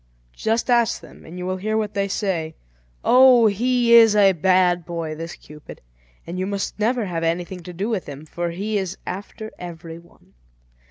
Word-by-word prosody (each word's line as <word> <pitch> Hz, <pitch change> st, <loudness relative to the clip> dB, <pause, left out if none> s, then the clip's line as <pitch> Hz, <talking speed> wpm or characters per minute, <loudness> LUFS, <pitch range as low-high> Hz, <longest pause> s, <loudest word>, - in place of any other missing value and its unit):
Just 225 Hz, -, -1 dB
ask 235 Hz, -1 st, +2 dB
them, -, -, -16 dB
and 170 Hz, +3 st, -10 dB
you 180 Hz, -, -5 dB
will 185 Hz, 0 st, -2 dB
hear 215 Hz, +3 st, -2 dB
what 215 Hz, -1 st, -2 dB
they 200 Hz, 0 st, -1 dB
say. 175 Hz, -6 st, -2 dB, 0.5 s
Oh! 255 Hz, -2 st, +6 dB
he 235 Hz, +3 st, +2 dB
is 225 Hz, -2 st, +7 dB
a 200 Hz, -2 st, +6 dB
bad 180 Hz, 0 st, +2 dB
boy, 165 Hz, -2 st, -5 dB
this 165 Hz, +2 st, -7 dB
Cupid, 150 Hz, 0 st, -13 dB, 0.5 s
and 175 Hz, +2 st, -6 dB
you 185 Hz, -, -2 dB
must 200 Hz, +1 st, -4 dB
never 230 Hz, +1 st, 0 dB
have 170 Hz, -3 st, -3 dB
anything 175 Hz, +2 st, -2 dB
to 180 Hz, -, -9 dB
do 190 Hz, +4 st, -4 dB
with 220 Hz, -6 st, -3 dB
him, 145 Hz, +2 st, -9 dB
for 170 Hz, +2 st, -4 dB
he 205 Hz, +5 st, -2 dB
is 190 Hz, -1 st, -5 dB
after 205 Hz, +3 st, -7 dB
every 165 Hz, -2 st, -9 dB
one. 170 Hz, -, -23 dB
190 Hz, 185 wpm, -22 LUFS, 170-220 Hz, 0.5 s, is